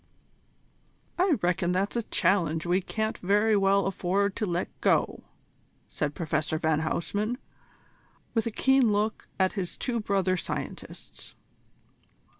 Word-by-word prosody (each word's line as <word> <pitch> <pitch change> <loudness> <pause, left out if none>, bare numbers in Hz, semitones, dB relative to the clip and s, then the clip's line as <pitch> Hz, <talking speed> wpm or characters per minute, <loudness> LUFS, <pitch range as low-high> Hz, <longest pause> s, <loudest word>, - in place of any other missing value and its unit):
"I 365 -3 +4
reckon 180 0 +1
that's 195 +4 0
a 235 - +1
challenge 170 -6 +1
we 180 +2 +2
can't 220 +3 -3
very 210 +3 +3
well 195 0 +3
afford 195 +1 0
to 215 - -1
let 175 0 -1
go," - - +1 0.6
said 150 -1 -3
Professor 155 -1 -1
van 155 -1 +1
Huysman, 205 +9 -1 1.0
with 225 -1 +1
a - - +1
keen 265 +1 +3
look 210 +2 -1
at 190 0 +2
his 190 -4 -4
two 240 -2 -1
brother 195 -3 +1
scientists. - - -7
195 Hz, 125 wpm, -28 LUFS, 175-215 Hz, 1.0 s, I